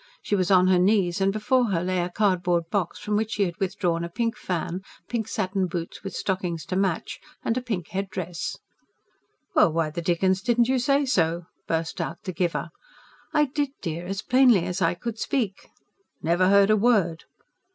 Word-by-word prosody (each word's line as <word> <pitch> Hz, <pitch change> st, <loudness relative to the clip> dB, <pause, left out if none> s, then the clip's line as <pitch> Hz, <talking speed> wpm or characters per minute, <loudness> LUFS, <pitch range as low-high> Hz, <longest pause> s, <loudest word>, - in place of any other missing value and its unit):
She -, -, -3 dB
was 185 Hz, -2 st, +1 dB
on 185 Hz, -2 st, +6 dB
her 185 Hz, -1 st, +4 dB
knees, 185 Hz, -2 st, +2 dB
and 195 Hz, 0 st, +3 dB
before 245 Hz, +5 st, +2 dB
her 175 Hz, -3 st, 0 dB
lay 185 Hz, 0 st, 0 dB
a 175 Hz, 0 st, -1 dB
cardboard 180 Hz, -3 st, +1 dB
box 190 Hz, -4 st, -1 dB
from 210 Hz, -, -2 dB
which 220 Hz, +1 st, 0 dB
she 205 Hz, -, +1 dB
had 175 Hz, -2 st, -4 dB
withdrawn 175 Hz, -3 st, -1 dB
a 170 Hz, -, -4 dB
pink 230 Hz, +6 st, -1 dB
fan, 180 Hz, -4 st, -3 dB, 0.3 s
pink 225 Hz, -3 st, -2 dB
satin 190 Hz, -2 st, -1 dB
boots 170 Hz, -1 st, -5 dB
with 195 Hz, -, -6 dB
stockings 180 Hz, -5 st, -2 dB
to 185 Hz, -, -3 dB
match, 190 Hz, -3 st, -1 dB, 0.3 s
and 225 Hz, -, +1 dB
a 255 Hz, -, -1 dB
pink 215 Hz, -9 st, -4 dB
head 195 Hz, 0 st, -3 dB
dress. 180 Hz, -2 st, -4 dB, 1.0 s
"Well, -, -, +5 dB
why 160 Hz, -1 st, 0 dB
the 170 Hz, -, -4 dB
dickens 185 Hz, +2 st, +1 dB
didn't 235 Hz, +2 st, +2 dB
you 260 Hz, -1 st, +2 dB
say 280 Hz, +3 st, +2 dB
so?" 170 Hz, -8 st, +1 dB, 0.2 s
burst 165 Hz, 0 st, -1 dB
out -, -, -5 dB
the 185 Hz, -, -4 dB
giver. 170 Hz, -1 st, -1 dB, 0.6 s
"I 300 Hz, -1 st, +3 dB
did, 285 Hz, 0 st, -2 dB
dear. 170 Hz, 0 st, -4 dB
As 195 Hz, +2 st, -3 dB
plainly 250 Hz, -8 st, +5 dB
as 180 Hz, +1 st, -3 dB
I 165 Hz, 0 st, +2 dB
could 230 Hz, +4 st, -5 dB
speak." 215 Hz, -8 st, -2 dB, 0.6 s
"Never 175 Hz, +3 st, +3 dB
heard 200 Hz, +1 st, +5 dB
a -, -, +6 dB
word!" 200 Hz, -7 st, +2 dB
190 Hz, 195 wpm, -25 LUFS, 175-215 Hz, 1.0 s, on